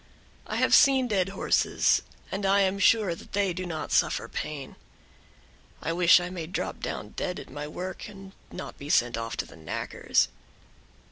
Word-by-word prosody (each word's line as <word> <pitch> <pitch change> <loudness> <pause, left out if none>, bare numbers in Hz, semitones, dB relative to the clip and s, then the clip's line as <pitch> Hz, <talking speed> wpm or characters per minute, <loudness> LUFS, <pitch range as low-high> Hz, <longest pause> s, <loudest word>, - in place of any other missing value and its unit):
I - - -3
have - - +2
seen 270 -3 +6
dead 195 -4 +1
horses, 195 - +2 0.3
and 195 +1 -3
I 195 +1 +4
am 195 0 +1
sure 205 -2 +4
they 195 +2 -2
do 185 +1 -4
not 160 -2 -5
suffer - - +2
pain; 145 -3 -6 1.0
I 165 - -2
wish 175 +1 +6
I 175 0 -5
may 170 -3 -5
drop 185 - -4
down - - -5
dead 180 - -4
at - - -11
my 145 +2 -5
work, 180 +4 -6
and 195 -1 -11 0.2
not - - -8
be 140 - -8
sent 120 -5 +3
off 115 0 -4
to - - -2
the - - -14
knackers." 80 -1 0
180 Hz, 175 wpm, -27 LUFS, 155-195 Hz, 1.0 s, seen